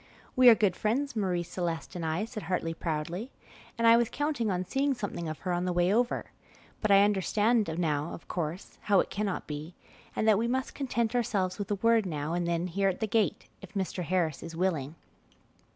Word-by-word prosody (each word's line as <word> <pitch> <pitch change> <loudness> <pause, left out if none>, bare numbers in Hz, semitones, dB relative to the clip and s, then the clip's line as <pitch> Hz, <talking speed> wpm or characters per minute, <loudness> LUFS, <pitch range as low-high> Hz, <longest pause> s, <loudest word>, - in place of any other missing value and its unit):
"We 255 -1 +8
are 230 - +8
good 205 -5 +2
friends, 255 +5 -1
Marie 185 -5 0
Celeste 170 -1 -4
and 175 - -4
I," 160 +6 -1
said 225 -1 -7
Hartley 165 -3 -1
proudly, 170 - -3 0.5
"and 230 - +1
I 230 0 +8
was 235 -1 +2
counting 290 -7 -1
on 185 -1 -1
seeing 275 +7 0
something 205 -7 -4
of 155 - -5
her 180 - -1
on 175 +1 -1
the 180 - 0
way 175 +2 +2
over, 240 +2 0 0.5
but 215 - 0
I 200 0 +7
understand 210 +2 +2
now, 155 -2 0
of - - -9
course, 170 +1 -4
how 200 -2 +3
it - - 0
cannot 200 -2 -2
be, 155 +3 -7 0.4
and 220 - 0
that 215 -2 +5
we 230 - 0
must 260 +2 -1
content 235 -4 -1
ourselves 200 -5 0
with 200 - -4
a 205 - +1
word 225 0 +3
now 155 -1 -3
and 175 0 -1
then 170 0 0
here 195 +2 +1
at 185 - -3
the 220 - 0
gate, 215 -1 0
if 195 0 -13
Mr. 190 -1 -2
Harris 165 -3 0
is 165 -1 -8
willing." 165 -5 -1
190 Hz, 210 wpm, -29 LUFS, 170-225 Hz, 0.5 s, We